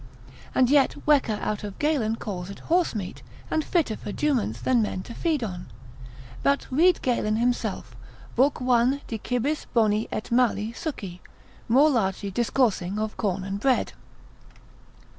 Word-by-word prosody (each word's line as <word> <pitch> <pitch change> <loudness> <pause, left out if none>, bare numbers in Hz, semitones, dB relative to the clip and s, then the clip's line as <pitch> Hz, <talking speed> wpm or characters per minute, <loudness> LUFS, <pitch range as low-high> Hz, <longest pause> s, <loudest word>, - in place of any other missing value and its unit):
And 255 0 +4
yet 285 -2 +4
Wecker 275 -8 +3
out 210 0 -2
of 205 -2 -6
Galen 275 -8 +1
calls 190 -5 -5
it 200 - -9
horsemeat, 215 - 0 0.3
and 315 - +1
fitter 310 -12 0
for 210 - -7
juments 240 - 0
than 250 -3 +2
men 190 -3 -2
to 235 - -9
feed 310 -1 0
on. 180 -5 -5 0.7
But 280 0 +2
read 340 +7 +4
Galen 225 -4 +1
himself, 245 +2 -1 0.4
Lib. 270 +4 +3
1. 250 +2 +2
De 225 - -4
cibis 255 +7 -2
boni 215 -1 +3
et 215 - -4
mali 235 -3 +2
succi, 200 - -6 0.5
more 280 +6 +5
largely 200 -4 0
discoursing 210 -4 +1
of 215 0 -2
corn 195 -3 -1
and 195 +1 -4
bread. 260 +3 +1
235 Hz, 145 wpm, -25 LUFS, 205-270 Hz, 0.7 s, more